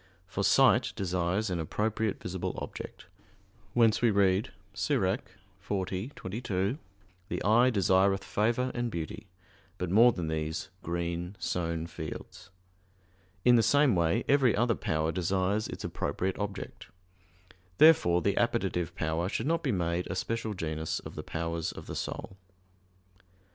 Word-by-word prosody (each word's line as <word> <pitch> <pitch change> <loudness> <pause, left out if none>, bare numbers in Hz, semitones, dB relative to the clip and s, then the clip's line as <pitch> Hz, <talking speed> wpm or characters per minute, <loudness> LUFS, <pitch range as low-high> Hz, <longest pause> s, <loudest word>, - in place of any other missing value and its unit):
For - - -3
sight - - +4
desires 95 +2 -1
an 90 - -1
appropriate 110 +6 -1
visible 90 0 -4
object; - - -8 0.7
whence 115 -2 +4
we 120 - +4
read 100 -1 +2 0.2
(Ecclus. - - +1 0.4
40:22): 100 - -3 0.5
"The - - -3
eye 120 +5 +5
desireth 95 -3 +3
favor 120 +4 0
and 120 -1 -1
beauty, 85 -2 -6 0.5
but 90 -1 -3
more 115 +5 +7
than 90 -7 -4
these 80 0 -3
green 85 +2 -3
sown 85 -2 -2
fields." 80 +3 -8 1.0
In 125 -1 +7
the - - +5
same 140 +1 +4
way 85 +7 +2
every 135 -5 +4
other 115 +2 +2
power 80 -5 -1
desires 95 +4 0
its - - -7
appropriate 90 +7 -2
object. 100 -1 -5 0.9
Therefore 90 - +6
the 100 - +1
appetitive 95 -8 0
power 80 +3 -1
should 110 - -2
not 165 +2 +1
be 140 - 0
made 85 -2 -1
a 95 - -4
special 110 +2 -2
genus 80 -2 -3
of - - -8
the - - -5
powers 85 0 -3
of - - -10
the - - -6
soul. 95 - -5
95 Hz, 135 wpm, -30 LUFS, 85-115 Hz, 1.0 s, more